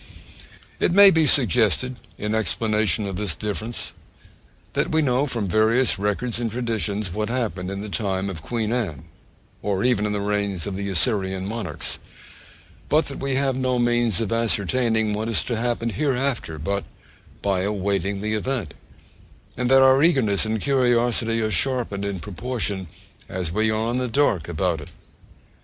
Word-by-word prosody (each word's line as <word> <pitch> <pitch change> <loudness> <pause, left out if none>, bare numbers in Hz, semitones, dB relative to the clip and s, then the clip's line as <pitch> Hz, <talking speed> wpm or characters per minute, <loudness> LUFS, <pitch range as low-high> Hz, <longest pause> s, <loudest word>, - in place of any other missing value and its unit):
It - - +2
may 200 +1 +9
be 160 -3 +3
suggested 125 -2 +3 0.2
in 105 +1 -3
explanation 110 0 +1
of 95 -2 -4
this 100 -4 0
difference, 110 +2 -3 0.8
that - - 0
we 160 0 +2
know 130 +1 +1
from 115 -6 -2
various 110 +4 +3
records 105 +4 -1
and 120 -1 -1
traditions 110 -4 -1
what 105 +2 -2
happened 105 -8 -2
in 100 0 -4
the 105 - -6
time 95 0 -1
of 90 -5 -5
Queen 115 +4 -2
Anne, 95 - -3 0.6
or 100 -1 -1
even 115 -4 +2
in - - -2
the 105 - -1
reigns 100 -3 -1
of 100 - -4
the 100 +1 -3
Assyrian 95 -2 +1
monarchs, 115 +2 -2 0.9
but 155 +1 +2
that 140 - -7
we 135 -1 -1
have 135 -1 +1
no 130 -1 0
means 120 -4 +2
of 115 -2 -2
ascertaining 115 0 +1
what 110 +2 -2
is 115 - +2
to 120 - -2
happen 115 0 -1
hereafter 135 - -1
but 100 +6 -2 0.6
by 100 -2 +1
awaiting 100 -1 -1
the 110 +1 -1
event, 110 - -2 0.8
and 125 -1 -1
that 135 0 +6
our 130 +1 +6
eagerness 130 - +3
and 110 -1 -2
curiosity 120 -4 +2
are 110 -1 -1
sharpened 120 -6 0
in 100 -2 -3
proportion 105 -1 -3 0.4
as 90 -3 -3
we 110 +4 +1
are 110 +2 0
in 120 - -1
the 125 0 -1
dark 115 - +1
about 85 -1 -1
it. 75 - -10
110 Hz, 165 wpm, -23 LUFS, 100-125 Hz, 0.9 s, may